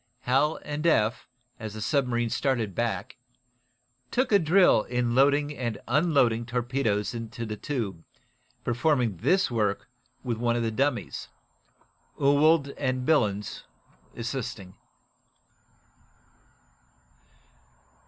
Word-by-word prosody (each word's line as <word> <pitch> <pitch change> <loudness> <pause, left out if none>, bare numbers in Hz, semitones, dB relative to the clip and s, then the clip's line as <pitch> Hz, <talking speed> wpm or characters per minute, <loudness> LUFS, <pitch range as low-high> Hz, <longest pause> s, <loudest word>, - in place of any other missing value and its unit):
Hal 135 +5 +2
and 150 +3 -2
Eph, 110 -8 +2 0.3
as 110 -2 -6
the - - -6
submarine 120 -2 0
started 120 -8 0
back, 120 +4 -3 0.9
took 255 0 0
a 200 - +6
drill 175 - +5
in 120 -1 -1
loading 145 +3 +3
and 120 -5 -3
unloading 130 -4 +2
torpedoes 120 -3 -1
into 115 0 -6
the 110 -1 -4
tube, 105 - -4 0.6
performing 120 - +1
this 185 - +2
work 105 -3 -1 0.4
with 120 -3 -2
one 120 0 +1
of 120 - 0
the 115 - -1
dummies, 130 -1 -2 0.9
Ewald 145 +1 +4
and 130 -2 -1
Billens 105 -10 +1 0.5
assisting. 115 -6 -5
125 Hz, 105 wpm, -27 LUFS, 115-145 Hz, 0.9 s, a